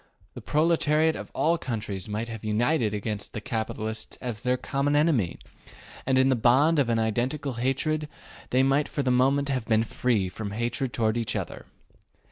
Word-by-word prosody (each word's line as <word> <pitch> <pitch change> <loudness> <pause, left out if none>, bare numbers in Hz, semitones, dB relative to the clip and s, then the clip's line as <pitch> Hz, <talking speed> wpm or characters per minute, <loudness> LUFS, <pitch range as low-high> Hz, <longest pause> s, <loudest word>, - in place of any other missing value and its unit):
The - - -8
proletariat 155 0 +2
of - - -7
all 170 +2 +2
countries 105 - -4
might 110 +3 -3
have 115 -2 -7
united 110 +3 +1
against 105 0 -4
the - - -3
capitalists 110 0 -4
as 120 -4 -5
their 125 0 +1
common 140 +3 0
enemy, 145 - +2 0.7
and 130 -1 +3
in 130 +1 +4
the 130 - +4
bond 135 +7 +4
of 130 -4 +2
an 115 - +2
identical 120 +6 -1
hatred 150 +4 0 0.4
they 130 +1 +3
might 135 +2 +2
for 145 -2 -2
the 130 - +1
moment 135 +3 +2
have 130 -4 -2
been 110 -1 +3
free 115 -3 0
from 100 +2 -6
hatred 120 +3 -2
toward 110 -1 0
each 115 -2 -2
other. - - -5
125 Hz, 175 wpm, -26 LUFS, 110-140 Hz, 0.7 s, in